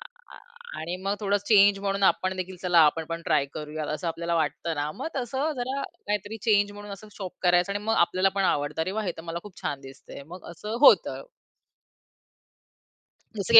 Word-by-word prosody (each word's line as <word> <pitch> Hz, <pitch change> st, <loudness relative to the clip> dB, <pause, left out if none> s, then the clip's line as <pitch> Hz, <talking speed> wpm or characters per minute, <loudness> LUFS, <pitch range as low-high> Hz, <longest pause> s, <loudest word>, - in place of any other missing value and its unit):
आ -, -, -11 dB, 0.3 s
आ -, -, -12 dB, 0.4 s
आणि 165 Hz, +3 st, -3 dB
मग 195 Hz, +1 st, 0 dB
थोडा 205 Hz, 0 st, +2 dB
चेंज 205 Hz, -1 st, +5 dB
म्हणून 195 Hz, 0 st, -1 dB
आपण 185 Hz, 0 st, +2 dB
देखील 185 Hz, 0 st, -5 dB
चला 180 Hz, -2 st, +3 dB
आपण 160 Hz, +2 st, 0 dB
पण 165 Hz, 0 st, -4 dB
ट्राय 150 Hz, -2 st, +3 dB
करूया 155 Hz, 0 st, -5 dB
असं 170 Hz, +3 st, -4 dB
आपल्याला 170 Hz, +1 st, -2 dB
वाटतं 160 Hz, +1 st, -1 dB
ना, 145 Hz, 0 st, -2 dB
मग -, -, -6 dB
तसं 265 Hz, +5 st, -1 dB
जरा 260 Hz, +3 st, -2 dB
काहीतरी 210 Hz, -1 st, -4 dB
चेंज 205 Hz, -2 st, +3 dB
म्हणून 205 Hz, 0 st, -9 dB
असं 205 Hz, +2 st, -10 dB
शॉप 190 Hz, -3 st, -5 dB
करायचं 180 Hz, +1 st, +3 dB
आणि 205 Hz, +1 st, -3 dB
मग 225 Hz, -, +2 dB
आपल्याला 185 Hz, 0 st, +3 dB
पण 195 Hz, -, +2 dB
आवडतं, 145 Hz, -2 st, 0 dB
"अरे 185 Hz, -, -2 dB
वा! 220 Hz, -, -1 dB
हे 180 Hz, -4 st, -2 dB
तर 165 Hz, -, -8 dB
मला 170 Hz, 0 st, -4 dB
खूप 205 Hz, -3 st, -12 dB
छान 140 Hz, -, -2 dB
दिसतंय." 135 Hz, +1 st, -11 dB
मग 180 Hz, 0 st, -10 dB
असं 210 Hz, +7 st, -5 dB
होतं. -, -, +6 dB, 2.2 s
जसं 200 Hz, +4 st, -2 dB
की 230 Hz, -, +14 dB
185 Hz, 200 wpm, -26 LUFS, 165-205 Hz, 2.2 s, की